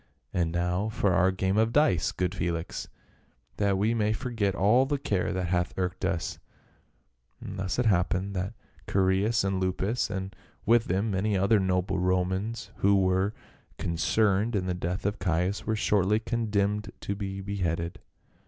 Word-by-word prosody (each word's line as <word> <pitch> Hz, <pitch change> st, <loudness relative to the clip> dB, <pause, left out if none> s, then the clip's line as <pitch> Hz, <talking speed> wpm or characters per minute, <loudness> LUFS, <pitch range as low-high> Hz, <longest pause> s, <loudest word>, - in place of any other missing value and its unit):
And 85 Hz, -2 st, +1 dB
now 90 Hz, +4 st, 0 dB
for 100 Hz, -3 st, +1 dB
our 95 Hz, +1 st, +4 dB
game 95 Hz, +1 st, 0 dB
of 110 Hz, +1 st, +2 dB
dice, 120 Hz, -, +3 dB
good 90 Hz, 0 st, -1 dB
Felix, 85 Hz, -3 st, -3 dB, 0.7 s
that 100 Hz, -2 st, +2 dB
we 105 Hz, +4 st, +2 dB
may 110 Hz, -2 st, +1 dB
forget 110 Hz, -4 st, -1 dB
all 120 Hz, +8 st, +4 dB
the 145 Hz, 0 st, 0 dB
care 100 Hz, -10 st, -1 dB
that 90 Hz, -2 st, -2 dB
hath 90 Hz, 0 st, 0 dB
irked 90 Hz, 0 st, -2 dB
us 95 Hz, -3 st, -2 dB, 0.5 s
!" -, -, -44 dB
Thus 95 Hz, -2 st, -4 dB
it 125 Hz, -, +1 dB
happened 95 Hz, -1 st, +1 dB
that 95 Hz, +4 st, -3 dB, 0.3 s
Chaereas 95 Hz, +3 st, +2 dB
and 95 Hz, -1 st, 0 dB
Lupus, 95 Hz, +6 st, 0 dB
and 95 Hz, -1 st, -4 dB, 0.3 s
with 115 Hz, +1 st, +4 dB
them 100 Hz, +5 st, 0 dB
many 100 Hz, +1 st, +1 dB
other 100 Hz, +3 st, +4 dB
noble 95 Hz, 0 st, 0 dB
Romans 95 Hz, +5 st, -1 dB
who 100 Hz, +1 st, +4 dB
were 95 Hz, +2 st, +1 dB, 0.4 s
con 85 Hz, -, -2 dB
cerned 105 Hz, +4 st, +2 dB
in 95 Hz, -2 st, 0 dB
the 90 Hz, -, -1 dB
death 90 Hz, +1 st, -3 dB
of 100 Hz, 0 st, -1 dB
Caius, 90 Hz, +3 st, -1 dB
were 110 Hz, -, +1 dB
shortly 105 Hz, 0 st, +2 dB
condemned 105 Hz, -3 st, -1 dB
to 100 Hz, -, -2 dB
be 100 Hz, -1 st, -5 dB
beheaded. 85 Hz, -4 st, -2 dB
95 Hz, 160 wpm, -28 LUFS, 90-105 Hz, 0.7 s, our